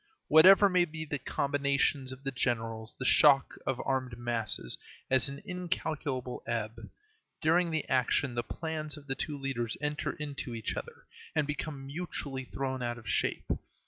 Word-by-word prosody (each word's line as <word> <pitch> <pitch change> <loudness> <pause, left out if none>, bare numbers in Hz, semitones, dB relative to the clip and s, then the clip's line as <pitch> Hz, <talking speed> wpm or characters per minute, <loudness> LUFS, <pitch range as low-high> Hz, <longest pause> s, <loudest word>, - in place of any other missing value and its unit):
Whatever 190 +6 +9
may 180 -2 +4
be 160 -1 -6
the 145 -1 -3
combinations 140 -1 +1
of 130 +1 -9
the 135 - -1
generals, 115 -3 -2
the 130 - -4
shock 140 0 +6
of 130 - 0
armed 130 -3 -1
masses 115 - -1 0.4
has 130 -1 +4
an 140 +4 -8
incalculable 160 - -3
ebb. 115 -1 -3 0.5
During 170 +3 +3
the 160 -2 -1
action 130 0 +2
the 120 - 0
plans 155 +1 -4
of 145 - -12
the 135 - -1
two 145 +2 -3
leaders 130 -5 -2
enter 150 0 -2
into 140 -5 -5
each 110 - -3
other - - -7 0.3
and 155 -2 +3
become 145 -1 -4
mutually 140 -3 -4
thrown 130 0 -3
out 120 0 -2
of 110 -3 -12
shape. - - 0
135 Hz, 160 wpm, -31 LUFS, 125-155 Hz, 0.5 s, Whatever